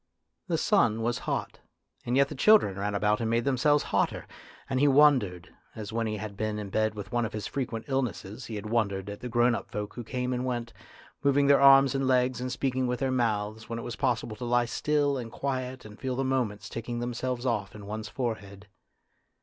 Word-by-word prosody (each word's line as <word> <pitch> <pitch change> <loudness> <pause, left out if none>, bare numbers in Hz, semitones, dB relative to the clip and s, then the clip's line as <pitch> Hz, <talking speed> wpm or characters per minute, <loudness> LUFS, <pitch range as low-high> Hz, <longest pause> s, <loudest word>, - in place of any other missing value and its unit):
The - - 0
sun 110 +1 +2
was 120 +1 0
hot, - - -3 0.5
and 125 +2 +1
yet 140 0 +5
the - - -5
children 205 - +5
ran 100 +1 -1
about 105 +2 +1
and 115 - 0
made 115 +1 +1
themselves 140 +2 +3
hotter, - - +1 0.4
and 130 -1 -1
he 145 - +4
wondered, 130 -12 +3 0.2
as 110 -1 -7
when 115 0 0
he 110 0 -2
had 105 -1 -6
been 110 +1 -2
in 105 -2 -6
bed 110 +1 +1
with 105 +1 -7
one 120 -1 +1
of 110 - -3
his 105 -1 -4
frequent 120 -5 -4
illnesses 125 -7 -3
he 110 - -6
had 105 0 -6
wondered 100 -3 -1
at 100 - -8
the 125 - -6
grown 120 +1 +3
up - - -4
folk 105 0 -5
who 120 - -6
came 125 +2 -2
and 125 0 -2
went, 120 -2 -3 0.5
moving 140 0 +3
their 140 0 +5
arms 135 -1 +7
and 135 -1 0
legs 125 -1 +2
and 125 0 -3
speaking 130 -1 -1
with 125 0 -1
their 135 -1 0
mouths, 110 -3 -1
when 115 - -3
it 115 - -5
was 120 - -5
possible 120 -4 -1
to 125 - -7
lie 120 0 +2
still 145 +3 0
and 115 -2 -7
quiet 130 -1 -3
and 105 +1 -12
feel 130 -2 -2
the 135 - -1
moments 115 -6 -1
ticking 115 +2 -5
themselves 120 +1 -3
off 105 -6 -1
in 105 -1 -9
one's 110 +1 -5
forehead. 105 -5 -5
120 Hz, 220 wpm, -28 LUFS, 110-130 Hz, 0.5 s, arms